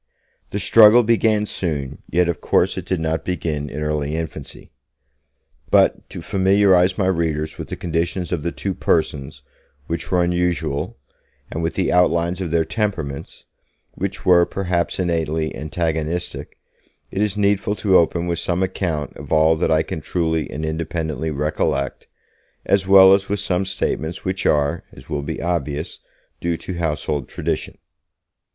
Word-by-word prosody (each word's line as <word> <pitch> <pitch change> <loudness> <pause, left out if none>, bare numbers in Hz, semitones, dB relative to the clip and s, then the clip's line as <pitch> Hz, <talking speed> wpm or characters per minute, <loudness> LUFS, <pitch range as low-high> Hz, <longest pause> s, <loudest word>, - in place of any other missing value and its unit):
The 100 - -3
struggle 110 +4 +7
began 110 -2 +2
soon, 75 -9 -3
yet 90 0 +2
of 85 -3 -2
course - - +2
it - - -6
did 95 - 0
not 80 0 -1
begin 75 -4 -3
in 75 +2 -4
early 75 0 -1
infancy. 80 -3 -7 1.0
But - - +3
to - - -8
familiarize 95 -1 +3
my 100 - +1
readers 80 -4 -1
with - - -5
the - - -5
conditions 85 +2 -2
of 85 -4 -1
the 85 +3 -2
two 95 +2 -3
persons 70 -6 -1 0.4
(which 85 +2 -4
were 90 -1 +3
unusual) 85 -6 -1 0.5
and 80 - -3
with 80 +1 -2
the 95 - 0
outlines 90 0 +2
of 90 - -2
their 80 0 +1
temperaments 80 -6 -4 0.5
(which 100 +1 -4
were, 90 -2 +6
perhaps 90 -3 -1
innately, 80 -3 -1
antagonistic), 80 +2 -3 0.5
it 95 - -2
is 105 -1 0
needful 100 0 +1
to 100 -3 +2
open 85 0 +3
with 85 -1 -1
some 90 +1 0
account 85 -5 -2
of - - -10
all 80 +1 +4
that 80 - 0
I 80 0 +3
can 80 - -5
truly 80 -1 -1
and 80 +1 -4
independently 80 0 -3
recollect, 70 -2 -2 0.6
as 95 -1 +2
well 95 0 +8
as 100 0 +1
with 100 0 0
some 95 -1 -1
statements 85 -3 -2
which 95 0 -1
are, 70 -1 +1
as 65 +3 -15
will 75 -2 -2
be 70 - -5
obvious, 80 -1 -3 0.4
due 85 -1 -1
to 90 0 -6
household 75 -4 -2
tradition. - - -3
85 Hz, 155 wpm, -21 LUFS, 80-95 Hz, 1.0 s, well